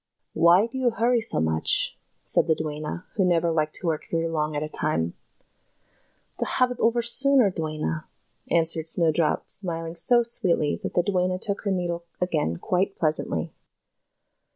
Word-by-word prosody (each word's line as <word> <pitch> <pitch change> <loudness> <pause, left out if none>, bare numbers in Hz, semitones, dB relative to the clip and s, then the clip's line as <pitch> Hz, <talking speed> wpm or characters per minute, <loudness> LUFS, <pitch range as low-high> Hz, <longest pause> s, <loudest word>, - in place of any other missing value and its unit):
"Why 175 +5 +4
do 240 +3 -7
you 255 -2 +2
hurry 235 +1 0
so 220 - +1
much," 80 0 +2 0.3
said - - +2
the 160 - +2
duenna, 155 +2 -6
who 200 - 0
never 170 -2 +1
liked 155 -1 -1
to - - -5
work 160 -2 -2
very 165 0 -1
long 155 -2 -3
at 145 - -2
a - - -4
time. 120 - -2 1.3
"To - - 0
have 250 -1 +1
it 250 - -7
over 235 +1 +1
the - - -10
sooner, 250 -2 +4
dear 165 -3 -4
duenna," 115 - -4 0.4
answered 165 -1 +2
Snowdrop, 165 -1 +2
smiling 165 -4 +3
so 240 +8 +5
sweetly 185 -10 0
that - - -6
the 175 - +2
duenna 185 -1 -1
took 200 +1 -4
her 200 - 0
needle 175 -2 -3 0.2
again 155 - -1
quite 185 - -2
pleasantly. 150 - -2
170 Hz, 170 wpm, -24 LUFS, 155-200 Hz, 1.3 s, so